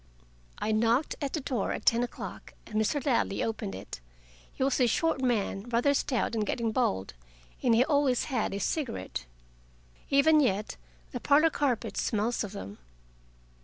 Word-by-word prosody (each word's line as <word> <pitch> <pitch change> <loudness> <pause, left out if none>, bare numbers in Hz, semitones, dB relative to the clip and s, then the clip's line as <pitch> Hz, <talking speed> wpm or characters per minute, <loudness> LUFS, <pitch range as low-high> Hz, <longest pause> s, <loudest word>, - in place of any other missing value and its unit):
I 220 - -1
knocked 230 +6 +2
at 280 -2 -2
the 315 - 0
door 255 -7 -2
at - - -6
ten 230 +1 +4
o'clock, 245 - -6
and - - -13
Mr. 220 +6 +1
Ladley 235 -7 +1
opened 215 - -3
it. 95 - -8 0.5
He - - -3
was 270 0 +1
a 250 - +4
short 320 +4 +1
man, 230 -3 -1
rather 245 +4 +3
stout 265 -4 0
and 220 -2 0
getting 230 +2 -1
bald, 95 - 0 0.5
and 235 -3 +4
he 245 +3 +5
always 285 -5 +2
had 250 -7 -1
a 200 - -3
cigarette. 240 - -3 0.8
Even 305 +3 +5
yet, 210 -7 0 0.4
the 245 - -4
parlor 300 +5 +4
carpet 270 -7 -1
smells 225 +2 0
of 205 - -6
them. 105 - -8
240 Hz, 165 wpm, -29 LUFS, 215-275 Hz, 0.8 s, he